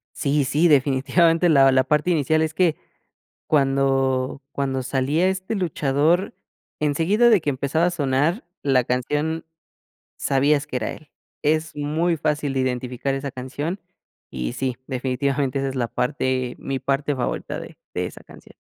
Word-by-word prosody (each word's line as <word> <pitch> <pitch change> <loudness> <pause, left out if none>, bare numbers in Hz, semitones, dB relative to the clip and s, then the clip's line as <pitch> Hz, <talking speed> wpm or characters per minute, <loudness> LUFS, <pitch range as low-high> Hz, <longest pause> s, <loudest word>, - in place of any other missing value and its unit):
Sí, 145 0 +1
sí. 150 +6 +3
Definitivamente, 160 +4 +3
la 135 -3 +6
la 130 0 +4
parte 150 +5 +1
inicial 155 -1 +2
es 160 0 -1
que, 165 -1 +2 0.7
cuando 135 -2 +1
cuando 135 -1 -1
salía 140 +7 +1
este 190 +3 -2
luchador, 165 - +1 0.5
enseguida 165 +11 +3
de 215 -6 +5
que 150 - -1
empezaba 140 +5 0
a 180 - +2
sonar 150 - 0 0.2
la 130 -3 +3
canción, 150 +6 -1 0.7
sabías 140 +1 +2
que - - -4
era 110 -3 -2
él. 155 - -14 0.3
Es 155 +1 0
muy 160 +4 0
fácil 150 -2 -1
de 135 - +1
identificar 130 +1 -2
esa 135 +1 -4
canción, 145 +9 -5 0.5
y 60 -2 -3
sí, 130 -2 -2
definitivamente 135 +1 -1
esa 135 - -1
es 135 - -5
la 120 -2 0
parte 130 -1 -1
mi 135 -1 -3
parte 140 +2 -1
favorita 125 -2 -3
de - - -10 0.2
de - - -1
esa - - -10
canción. - - -16
140 Hz, 150 wpm, -23 LUFS, 130-160 Hz, 0.7 s, la